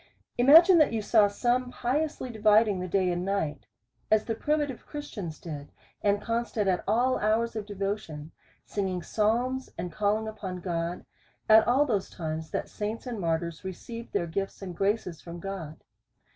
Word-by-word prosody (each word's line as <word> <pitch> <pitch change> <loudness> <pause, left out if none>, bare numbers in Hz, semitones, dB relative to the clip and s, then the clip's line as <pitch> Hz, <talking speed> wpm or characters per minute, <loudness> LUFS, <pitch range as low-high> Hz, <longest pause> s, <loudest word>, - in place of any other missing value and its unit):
Imagine 330 +8 +8
that 305 - +5
you 225 - 0
saw 210 -1 +5
some 245 +5 0
piously 265 +1 -2
dividing 215 -2 +4
the 180 - -3
day 185 0 +1
and 175 0 -2
night, 185 -7 -2 0.4
as 215 0 +3
the 225 - -1
primitive 295 +1 -1
Christians 210 - -6
did, 145 -4 -8 0.3
and 205 0 +2
constant 230 -2 -1
at 185 -2 +1
all 245 +5 +2
hours 225 +2 +1
of 210 -2 -4
devotion, 195 -7 -4 0.3
singing 190 -3 -2
psalms, 245 +5 0
and 175 +1 -4
calling 215 +3 0
upon 190 -4 -5
God, 170 -1 -3 0.4
at 220 0 +7
all 265 +4 +4
those 210 -8 -1
times, 160 -1 -5
that - - -3
saints 215 +3 -4
and 240 -4 -4
martyrs 165 -1 -2
received 230 +5 -7
their 170 - 0
gifts 195 +4 -4
and 180 -2 -6
graces 195 -3 -1
from 170 0 -8
God. 170 -5 -7
205 Hz, 160 wpm, -28 LUFS, 180-235 Hz, 0.4 s, Imagine